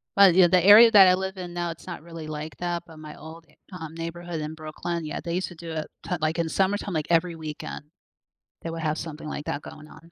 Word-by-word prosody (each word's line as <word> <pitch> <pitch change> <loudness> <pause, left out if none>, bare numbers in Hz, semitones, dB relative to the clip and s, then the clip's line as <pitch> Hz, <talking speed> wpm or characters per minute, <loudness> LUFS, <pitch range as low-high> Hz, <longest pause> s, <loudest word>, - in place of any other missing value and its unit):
but, 195 -3 +7
you 185 -2 +7
the 180 -1 +4
area 225 +3 +9
that 195 -3 +9
I 180 - +6
live 190 +1 -3
in 175 -1 -7
now, 175 -1 -2
it's 165 - -12
not 170 -3 -7
really 165 -2 -9
like 155 0 -6
that, 175 -1 -3
but 160 -2 -14
my 155 -1 -10
old, 160 +1 -12
e - - -26 0.2
um, 160 -3 -8
neighborhood 165 0 -5
in 150 +1 -5
Brooklyn, 160 +2 -5
yeah, 155 - -4
they 170 0 -3
used 185 - -1
to 175 - -12
do 165 0 -8
it 155 -1 -4 0.2
to - - -10
t 180 - +1
like, 155 +2 0
in 165 -1 0
summertime, 195 +1 0
like, 155 -2 -2
every 170 +1 +2
weekend, 155 -1 -7 0.8
they 165 - -4
would 165 0 -5
have 155 -1 -1
something 155 -1 -7
like 150 -1 -5
that 145 - -3
going 150 0 -11
on. 165 +2 -16
165 Hz, 260 wpm, -25 LUFS, 155-180 Hz, 0.8 s, area